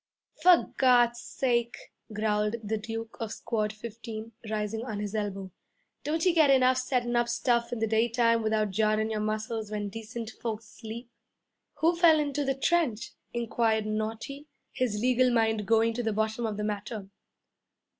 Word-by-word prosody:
'For 355 Hz, +1 st, +5 dB
Gawd's 240 Hz, -2 st, +4 dB
sake,' 235 Hz, -2 st, -1 dB, 0.2 s
growled 210 Hz, 0 st, 0 dB
the 215 Hz, +1 st, -2 dB
Duke 225 Hz, +1 st, -6 dB
of 225 Hz, -3 st, -4 dB
Squad 215 Hz, -3 st, -2 dB
15, 225 Hz, 0 st, -8 dB, 0.2 s
rising 215 Hz, +1 st, -2 dB
on 220 Hz, -5 st, -4 dB
his 205 Hz, 0 st, -4 dB
elbow, 195 Hz, -3 st, -3 dB, 0.5 s
'don't 320 Hz, +3 st, -1 dB
you 360 Hz, -, +4 dB
get 315 Hz, -4 st, +5 dB
enough 255 Hz, -1 st, +5 dB
settin' 245 Hz, -2 st, 0 dB
up 240 Hz, 0 st, +2 dB
stuff 235 Hz, 0 st, +1 dB
in 245 Hz, -, -2 dB
the 225 Hz, -, +1 dB
daytime 230 Hz, +1 st, +2 dB
without 215 Hz, -2 st, +1 dB
jarrin' 215 Hz, +2 st, +1 dB
your 215 Hz, -, -1 dB
muscles 215 Hz, 0 st, -2 dB
when 210 Hz, -1 st, -3 dB
decent 225 Hz, +2 st, -6 dB
folks 225 Hz, -2 st, -5 dB
sleep?' 235 Hz, +2 st, -8 dB, 0.7 s
'Who 335 Hz, +2 st, +4 dB
fell 335 Hz, -2 st, +6 dB
into 290 Hz, -1 st, -1 dB
the 270 Hz, -1 st, 0 dB
trench?' 270 Hz, -6 st, 0 dB, 0.2 s
inquired 230 Hz, -2 st, 0 dB
Naughty, 225 Hz, +7 st, -4 dB, 0.3 s
his 230 Hz, -5 st, -1 dB
legal 250 Hz, +2 st, +3 dB
mind 220 Hz, -3 st, +1 dB
going 225 Hz, +1 st, +3 dB
to 245 Hz, -, -2 dB
the 220 Hz, -2 st, -1 dB
bottom 220 Hz, +2 st, -1 dB
of 210 Hz, -2 st, -4 dB
the 210 Hz, -, -2 dB
matter. 210 Hz, 0 st, -4 dB
225 Hz, 160 wpm, -28 LUFS, 215-245 Hz, 0.7 s, fell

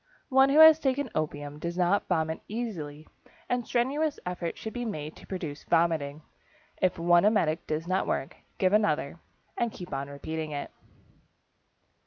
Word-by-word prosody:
One 265 Hz, 0 st, +5 dB
who 280 Hz, -, +3 dB
has 315 Hz, 0 st, +9 dB
taken 270 Hz, -2 st, -1 dB
opium 145 Hz, -1 st, -3 dB
does 170 Hz, +2 st, -4 dB
not 185 Hz, +3 st, +2 dB
vomit 160 Hz, -2 st, 0 dB
easily 165 Hz, -10 st, -5 dB, 0.4 s
and 245 Hz, -2 st, -1 dB
strenuous 280 Hz, +5 st, 0 dB
efforts 180 Hz, -1 st, -4 dB
should 220 Hz, -, -6 dB
be 245 Hz, -, -3 dB
made 155 Hz, -9 st, -5 dB
to -, -, -15 dB
produce 160 Hz, -6 st, -5 dB
vomiting. 160 Hz, -3 st, +1 dB, 0.6 s
If 185 Hz, -1 st, +2 dB
one 175 Hz, +1 st, +4 dB
emetic 175 Hz, -7 st, +2 dB
does 155 Hz, +2 st, -2 dB
not 185 Hz, +1 st, 0 dB
work, 135 Hz, -, -2 dB, 0.2 s
give 185 Hz, +1 st, +2 dB
another, 170 Hz, -7 st, +1 dB, 0.4 s
and 235 Hz, -1 st, 0 dB
keep 180 Hz, -6 st, -9 dB
on 135 Hz, +1 st, -3 dB
repeating 155 Hz, +2 st, -5 dB
it. 145 Hz, -1 st, -5 dB
175 Hz, 155 wpm, -28 LUFS, 155-225 Hz, 0.6 s, has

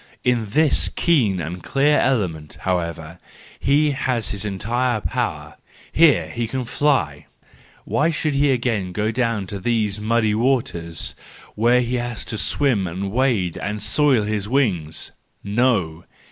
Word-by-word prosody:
In 120 Hz, -3 st, +1 dB
this 150 Hz, +8 st, +3 dB
keen 120 Hz, -, +1 dB
and 85 Hz, +2 st, -5 dB
clear 145 Hz, +3 st, +2 dB
element, 90 Hz, -, -1 dB
however, 85 Hz, -2 st, -3 dB, 0.4 s
he 145 Hz, +2 st, +2 dB
has 125 Hz, -4 st, -1 dB
his 100 Hz, -2 st, -2 dB
entire 115 Hz, +4 st, -1 dB
power: 80 Hz, -12 st, -3 dB, 0.3 s
here 145 Hz, -, +4 dB
he 115 Hz, +8 st, -3 dB
can 130 Hz, +2 st, -3 dB
fly! 115 Hz, -, 0 dB, 0.6 s
Why 155 Hz, +3 st, +1 dB
should 155 Hz, -2 st, -1 dB
he 140 Hz, +1 st, +2 dB
again 115 Hz, -8 st, 0 dB
go 105 Hz, +3 st, 0 dB
down 115 Hz, -2 st, 0 dB
into 100 Hz, +1 st, -6 dB
those 105 Hz, -1 st, 0 dB
muddy 110 Hz, 0 st, +1 dB
waters 105 Hz, -, -1 dB, 0.4 s
where 120 Hz, +3 st, +3 dB
he 125 Hz, +1 st, -1 dB
has 120 Hz, -1 st, -4 dB
to 110 Hz, -, -4 dB
swim 105 Hz, -1 st, +1 dB
and 95 Hz, +3 st, -4 dB
wade 115 Hz, -8 st, 0 dB
and 105 Hz, +1 st, -3 dB
soil 140 Hz, -2 st, +2 dB
his 105 Hz, -1 st, -2 dB
wings!—No! 100 Hz, -, -1 dB
110 Hz, 135 wpm, -21 LUFS, 95-130 Hz, 0.6 s, here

